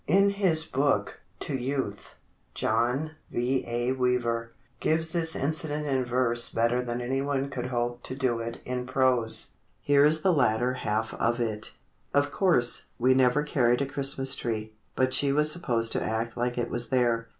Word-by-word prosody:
In 195 Hz, +5 st, +4 dB
his 180 Hz, -6 st, +2 dB
book, 135 Hz, -8 st, 0 dB, 0.2 s
"To 140 Hz, -, -3 dB
Youth," 130 Hz, -5 st, -4 dB, 0.4 s
John 120 Hz, +8 st, 0 dB, 0.2 s
V. 125 Hz, +2 st, 0 dB
A. 120 Hz, +1 st, -1 dB
Weaver, 120 Hz, -3 st, 0 dB, 0.3 s
gives 160 Hz, +1 st, 0 dB
this 165 Hz, -1 st, -1 dB
incident 150 Hz, +1 st, -1 dB
in 135 Hz, -3 st, 0 dB
verse 120 Hz, -1 st, +1 dB
better 115 Hz, +2 st, +1 dB
than 120 Hz, 0 st, -4 dB
anyone 135 Hz, +2 st, -1 dB
could 125 Hz, -2 st, -4 dB
hope 120 Hz, -1 st, -2 dB
to 130 Hz, -, -5 dB
do 130 Hz, -4 st, 0 dB
it 115 Hz, 0 st, -6 dB
in 125 Hz, 0 st, -3 dB
prose. 130 Hz, -3 st, +2 dB, 0.3 s
Here 145 Hz, 0 st, +4 dB
is 155 Hz, +1 st, +4 dB
the 185 Hz, -, +4 dB
latter 125 Hz, -3 st, +2 dB
half 110 Hz, -3 st, -2 dB
of 120 Hz, +1 st, 0 dB
it: 110 Hz, -2 st, -1 dB, 0.4 s
Of 145 Hz, 0 st, +2 dB
course, 165 Hz, -11 st, +2 dB
we 130 Hz, +2 st, +4 dB
never 130 Hz, +2 st, +3 dB
carried 125 Hz, -3 st, +2 dB
a -, -, -1 dB
Christmas 135 Hz, -1 st, 0 dB
tree, 110 Hz, -3 st, -4 dB, 0.2 s
But 130 Hz, 0 st, +1 dB
she 140 Hz, -1 st, +3 dB
was 150 Hz, +2 st, +3 dB
supposed 120 Hz, -9 st, 0 dB
to -, -, +1 dB
act 110 Hz, +1 st, -2 dB
like 120 Hz, 0 st, -2 dB
it 120 Hz, -, -2 dB
was 120 Hz, 0 st, 0 dB
there. 120 Hz, -3 st, +1 dB
125 Hz, 170 wpm, -27 LUFS, 120-140 Hz, 0.4 s, In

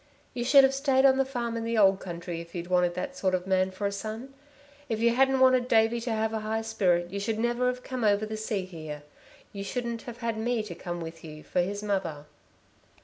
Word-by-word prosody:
You 245 Hz, -1 st, -2 dB
should 275 Hz, +2 st, +7 dB
have 270 Hz, 0 st, +4 dB
stayed 270 Hz, -1 st, +3 dB
on 265 Hz, -1 st, +6 dB
the 270 Hz, -, +3 dB
farm 240 Hz, -3 st, -3 dB
in 230 Hz, -, -3 dB
the 230 Hz, 0 st, -1 dB
old 195 Hz, -2 st, +5 dB
country 170 Hz, -1 st, -6 dB
if 170 Hz, +1 st, -13 dB
you'd 175 Hz, +1 st, -5 dB
wanted 180 Hz, -1 st, +2 dB
that 275 Hz, -1 st, -4 dB
sort 190 Hz, -8 st, +1 dB
of 180 Hz, 0 st, -3 dB
man 190 Hz, 0 st, +2 dB
for 190 Hz, +2 st, -5 dB
a 200 Hz, -, +1 dB
son. 220 Hz, +6 st, -6 dB, 0.6 s
If 220 Hz, -2 st, -1 dB
you 235 Hz, +1 st, +3 dB
hadn't 265 Hz, +1 st, +3 dB
wanted 255 Hz, -1 st, +5 dB
Davey 225 Hz, 0 st, +3 dB
to 235 Hz, 0 st, -3 dB
have 220 Hz, 0 st, 0 dB
a 220 Hz, -, -1 dB
high 220 Hz, +1 st, -2 dB
spirit 175 Hz, -5 st, +1 dB
you 200 Hz, -, -3 dB
should 215 Hz, +2 st, -2 dB
never 240 Hz, +2 st, +1 dB
have 250 Hz, 0 st, -2 dB
come 255 Hz, -2 st, -4 dB
over 205 Hz, 0 st, +3 dB
the 215 Hz, 0 st, -5 dB
sea 215 Hz, -3 st, -2 dB
here. 155 Hz, -5 st, -8 dB, 0.5 s
You 200 Hz, -1 st, -5 dB
shouldn't 235 Hz, +2 st, -3 dB
have 235 Hz, -, -8 dB
had 230 Hz, -2 st, -3 dB
me 235 Hz, 0 st, 0 dB
to 205 Hz, -5 st, -7 dB
come 175 Hz, 0 st, -6 dB
with 165 Hz, 0 st, -8 dB
you 155 Hz, -1 st, -10 dB
for 180 Hz, -, 0 dB
his 200 Hz, +3 st, -3 dB
mother...." 180 Hz, -8 st, -2 dB
220 Hz, 240 wpm, -28 LUFS, 185-240 Hz, 0.6 s, should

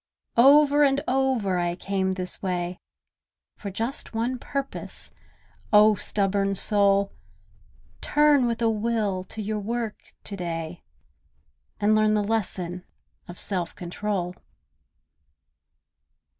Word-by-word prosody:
Over 290 Hz, +3 st, +6 dB
and 280 Hz, 0 st, +2 dB
over 250 Hz, -8 st, +1 dB
I 175 Hz, 0 st, -1 dB
came 190 Hz, 0 st, -1 dB
this 185 Hz, -1 st, -4 dB
way 180 Hz, -1 st, -2 dB, 0.8 s
For 205 Hz, -, -6 dB
just 225 Hz, +5 st, -4 dB
one 240 Hz, +3 st, -1 dB
purpose: 275 Hz, +2 st, -5 dB, 0.6 s
O 210 Hz, 0 st, +7 dB
stubborn 195 Hz, 0 st, +1 dB
soul! 200 Hz, 0 st, +2 dB, 0.9 s
Turn 295 Hz, -4 st, +4 dB
with 235 Hz, 0 st, -2 dB
a 225 Hz, -, +4 dB
will 215 Hz, -4 st, -1 dB
to 215 Hz, -, -6 dB
your 215 Hz, +1 st, -2 dB
work 225 Hz, +1 st, -3 dB, 0.2 s
to 200 Hz, -, -5 dB
day, 170 Hz, -2 st, -5 dB, 1.0 s
And 210 Hz, +1 st, +3 dB
learn 215 Hz, 0 st, +3 dB
the 210 Hz, -, +1 dB
lesson 185 Hz, -5 st, -2 dB, 0.4 s
of 175 Hz, -, -10 dB
Self 180 Hz, -4 st, 0 dB
Control. 180 Hz, 0 st, -3 dB
205 Hz, 110 wpm, -25 LUFS, 185-235 Hz, 1.0 s, O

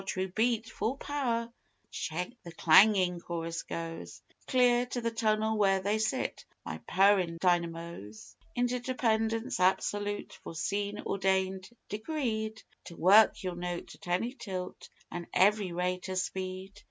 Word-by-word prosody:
True 190 Hz, 0 st, -2 dB
beat, 225 Hz, +3 st, +1 dB
full 225 Hz, +3 st, -2 dB
power, 235 Hz, -6 st, -2 dB, 0.6 s
the 180 Hz, +3 st, -6 dB
clangin' 180 Hz, +1 st, +6 dB
chorus 165 Hz, -1 st, -4 dB
goes 165 Hz, 0 st, -7 dB, 0.2 s
Clear 245 Hz, -1 st, +3 dB
to 245 Hz, -, -3 dB
the 230 Hz, 0 st, -1 dB
tunnel 220 Hz, -1 st, +1 dB
where 195 Hz, -2 st, +4 dB
they 205 Hz, +3 st, 0 dB
sit, 220 Hz, +4 st, -1 dB, 0.2 s
my -, -, -5 dB
purrin' 190 Hz, -3 st, +3 dB
dynamoes. 170 Hz, -, -2 dB, 0.2 s
Interdependence 240 Hz, -2 st, 0 dB
absolute, 205 Hz, +2 st, 0 dB
foreseen, 200 Hz, +5 st, -3 dB
ordained, 190 Hz, -1 st, 0 dB, 0.2 s
decreed, 220 Hz, -2 st, -3 dB, 0.2 s
To 170 Hz, -, -10 dB
work, 200 Hz, +6 st, +6 dB
Ye'll 185 Hz, -1 st, -2 dB
note, 175 Hz, 0 st, -5 dB
at -, -, -14 dB
any 185 Hz, +8 st, 0 dB
tilt 185 Hz, -8 st, -6 dB, 0.2 s
an' 175 Hz, -1 st, -5 dB
every 200 Hz, -1 st, +4 dB
rate 180 Hz, +2 st, -2 dB
o' 185 Hz, -, -2 dB
speed. 185 Hz, +1 st, -4 dB
195 Hz, 125 wpm, -30 LUFS, 180-225 Hz, 0.6 s, clangin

